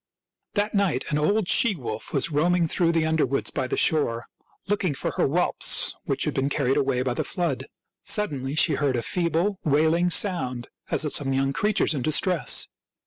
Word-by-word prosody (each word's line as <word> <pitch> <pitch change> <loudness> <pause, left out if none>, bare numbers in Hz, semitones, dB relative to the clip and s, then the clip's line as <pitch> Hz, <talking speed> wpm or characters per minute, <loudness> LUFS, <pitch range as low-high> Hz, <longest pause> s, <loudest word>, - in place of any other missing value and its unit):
That 205 +1 0
night 200 -10 0
an 150 - +1
old 200 +6 +1
she 230 0 +4
wolf 110 -7 -6
was 145 +3 0
roaming 170 +4 +2
through 170 +1 +1
the 165 -1 +1
underwoods 160 -4 0
by 130 - -2
the - - -3
shore, 120 -7 +1 0.4
looking 200 -7 0
for - - -3
her - - 0
whelps, - - +1
which - - -1
had - - -1
been 135 +1 0
carried 135 -2 0
away 130 -2 0
by 130 -2 -1
the - - -2
flood. 170 -7 -3 0.3
Suddenly 140 -9 -1
she - - +3
heard 140 -3 0
a 120 - -2
feeble, 175 +3 -1
wailing 160 +4 +2
sound, 165 - 0 0.2
as - - +2
of 150 - -2
some 135 -2 -1
young 135 +1 0
creature 210 +7 +1
in 135 - -2
distress. 155 +4 +2
155 Hz, 185 wpm, -24 LUFS, 135-180 Hz, 0.4 s, she